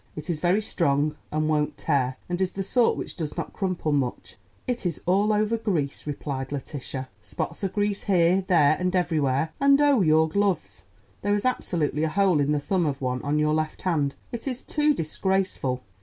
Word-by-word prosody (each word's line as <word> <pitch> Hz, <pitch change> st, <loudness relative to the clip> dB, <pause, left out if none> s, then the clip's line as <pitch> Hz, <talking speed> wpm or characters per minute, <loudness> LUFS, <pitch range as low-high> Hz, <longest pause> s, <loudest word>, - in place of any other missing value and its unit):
It 150 Hz, +3 st, -4 dB
is 155 Hz, -, -3 dB
very 180 Hz, +6 st, +2 dB
strong 150 Hz, -5 st, +1 dB, 0.2 s
and 155 Hz, 0 st, 0 dB
won't 150 Hz, -1 st, 0 dB
tear, 130 Hz, -4 st, 0 dB
and 175 Hz, +1 st, -2 dB
is 185 Hz, -, 0 dB
the 195 Hz, -, -3 dB
sort 235 Hz, +4 st, +2 dB
which -, -, -5 dB
does 155 Hz, -4 st, -5 dB
not -, -, -4 dB
crumple 185 Hz, -6 st, -1 dB
much." 135 Hz, -4 st, -2 dB, 0.3 s
"It 245 Hz, -2 st, -2 dB
is 175 Hz, -4 st, -2 dB
all 200 Hz, +4 st, +3 dB
over 215 Hz, +2 st, +1 dB
grease," 165 Hz, -12 st, -2 dB
replied 140 Hz, -2 st, -4 dB
Letitia; 135 Hz, -2 st, -5 dB
"spots -, -, -4 dB
of 195 Hz, -, -1 dB
grease 205 Hz, -1 st, -1 dB
here, 185 Hz, -1 st, +3 dB
there, 155 Hz, -5 st, +5 dB
and 180 Hz, 0 st, 0 dB
everywhere. 155 Hz, -4 st, +1 dB
And, 280 Hz, 0 st, +5 dB
oh, 285 Hz, -5 st, +4 dB
your 160 Hz, -2 st, +4 dB
gloves—there 160 Hz, -, -2 dB
is 205 Hz, -, -2 dB
absolutely 160 Hz, -, 0 dB
a 160 Hz, -, +1 dB
hole 190 Hz, -2 st, +3 dB
in 145 Hz, +1 st, +1 dB
the 150 Hz, -, +2 dB
thumb 175 Hz, +3 st, 0 dB
of 140 Hz, -2 st, -1 dB
the 135 Hz, -, -10 dB
one 125 Hz, 0 st, -1 dB
on 145 Hz, +1 st, 0 dB
your 150 Hz, 0 st, +2 dB
left 155 Hz, 0 st, -2 dB
hand. 150 Hz, -6 st, 0 dB, 0.2 s
It 235 Hz, +2 st, -5 dB
is 255 Hz, -1 st, -3 dB
too 300 Hz, -1 st, +1 dB
disgraceful!" 165 Hz, -, -1 dB
165 Hz, 195 wpm, -25 LUFS, 145-195 Hz, 0.3 s, there